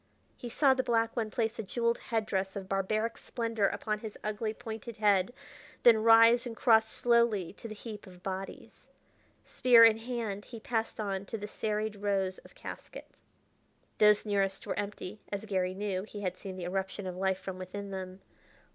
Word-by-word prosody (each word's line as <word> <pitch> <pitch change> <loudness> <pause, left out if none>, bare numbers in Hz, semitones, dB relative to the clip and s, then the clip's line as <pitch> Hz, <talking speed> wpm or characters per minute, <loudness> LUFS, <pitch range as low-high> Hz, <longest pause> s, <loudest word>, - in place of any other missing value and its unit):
He 240 - -7
saw 270 +3 +4
the 260 - +1
black 230 -2 +1
one 225 -3 -1
place 225 +1 -1
a - - -1
jeweled 235 +3 0
head 225 -4 -1
dress 190 -1 -2
of 195 -1 -5
barbaric 215 +4 -1
splendor 230 -4 -1
upon 215 +1 -2
his 215 -1 -8
ugly, 215 +1 -2
pointed 220 +1 -7
head, 205 -2 +3 0.5
then 230 -2 +7
rise 230 +2 +6
and 230 -2 -7
cross 220 -2 +5
slowly 235 -7 +2
to 230 - -9
the 215 - -7
heap 210 -1 -8
of 180 -1 -15
bodies. 190 0 -7 0.6
Spear 235 -2 +7
in 225 -1 +5
hand, 225 -4 -4
he 230 - -9
passed 225 0 -2
on 200 -2 -2
to 225 - -4
the 210 0 -6
serried 215 0 -2
rows 195 -2 -1
of - - -18
caskets. - - -9 0.8
Those 210 0 +5
nearest 195 -2 0
were - - -2
empty, 205 0 -5
as 200 +1 -3
Garry 185 -3 -1
knew; 195 -2 -2
he 205 +1 -8
had 185 -2 -2
seen 190 0 -8
the 180 - -5
eruption 190 +2 -3
of 185 -1 -4
life 190 0 0
from 190 -1 -7
within 195 +2 -6
them. 190 0 -6
210 Hz, 180 wpm, -31 LUFS, 195-225 Hz, 0.8 s, then